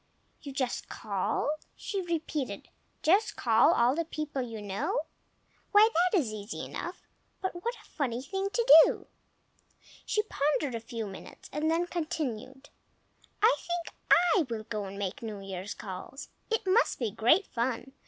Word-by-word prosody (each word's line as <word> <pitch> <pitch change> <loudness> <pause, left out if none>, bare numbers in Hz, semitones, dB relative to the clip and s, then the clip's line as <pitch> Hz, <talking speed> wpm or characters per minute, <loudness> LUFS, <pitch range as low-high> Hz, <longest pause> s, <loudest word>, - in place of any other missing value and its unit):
"You 285 - -7
just 260 -2 -2
call!" - - -1 0.3
she 395 -2 -3
repeated. 320 -5 -3 0.3
"Just 390 +8 +3
call 225 -2 +4
all 240 +2 +4
the 335 +3 0
people 305 -3 -4
you 230 -3 -5
know. 210 - -1 0.7
Why, 415 +1 +8 0.2
that - - +4
is 245 -11 0
easy 210 +1 -5
enough, - - -6 0.4
but 360 -2 -4
what 470 +1 -1
a - - -17
funny 255 -5 -2
thing 385 +5 -2
to 470 +3 +4
do!" - - -1 1.0
She 425 - +1
pondered 295 - 0
a 230 - -2
few 230 0 -5
minutes 195 -2 -10
and 300 +2 0
then 335 +2 +2
continued, 290 -6 -4 0.7
"I 455 +3 +7
think 345 -1 -4
I 345 -2 +5
will 225 -2 -3
go 215 -2 -4
and 195 +1 -7
make 195 -2 -3
New 215 -3 -5
Year's 195 +1 -6
calls. 200 +6 -8 0.2
It 450 -2 0
must 405 +6 +3
be 230 -5 -1
great 245 - +4
fun! 240 +2 -2
275 Hz, 155 wpm, -30 LUFS, 225-350 Hz, 1.0 s, Why